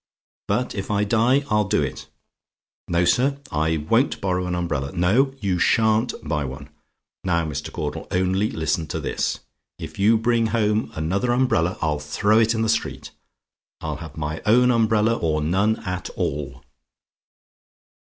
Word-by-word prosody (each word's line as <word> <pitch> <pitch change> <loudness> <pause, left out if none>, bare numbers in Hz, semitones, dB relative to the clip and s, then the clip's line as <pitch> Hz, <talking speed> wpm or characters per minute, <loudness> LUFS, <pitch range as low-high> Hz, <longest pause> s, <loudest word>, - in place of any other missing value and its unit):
But 125 - 0
if 100 -2 -5
I 105 0 +1
die 120 +6 +3
I'll 105 -2 +2
do - - +2
it. - - -5 0.8
No, 85 +1 +2
sir; 135 +10 +2
I 80 +1 +1
won't 115 - +1
borrow 90 -1 -1
an 90 - -1
umbrella. 75 -6 -2
No; 95 +10 +3
and 135 -3 -15
you 95 -3 0
sha'n't 110 +4 +2
buy 75 -2 0
one. 70 +2 -7 0.5
Now, 85 -3 +1
Mr. 75 -3 -5
Caudle, - - -4
only 95 +3 +1
listen 80 0 -1
to - - -3
this: - - -2 0.4
if - - -9
you 110 +3 +5
bring 115 0 +2
home 110 -1 0
another 95 +10 0
umbrella, 120 -9 +1
I'll 75 -2 0
throw 105 +9 +2
it 115 0 +3
in 110 - 0
the - - +1
street. 110 - -2 0.7
I'll - - -4
have 80 -1 -10
my 75 +1 -3
own 125 +3 +4
umbrella 110 -1 +3
or 80 -6 0
none 95 +8 +1
at 90 0 -4
all. 70 -2 -3
95 Hz, 160 wpm, -23 LUFS, 80-115 Hz, 0.8 s, you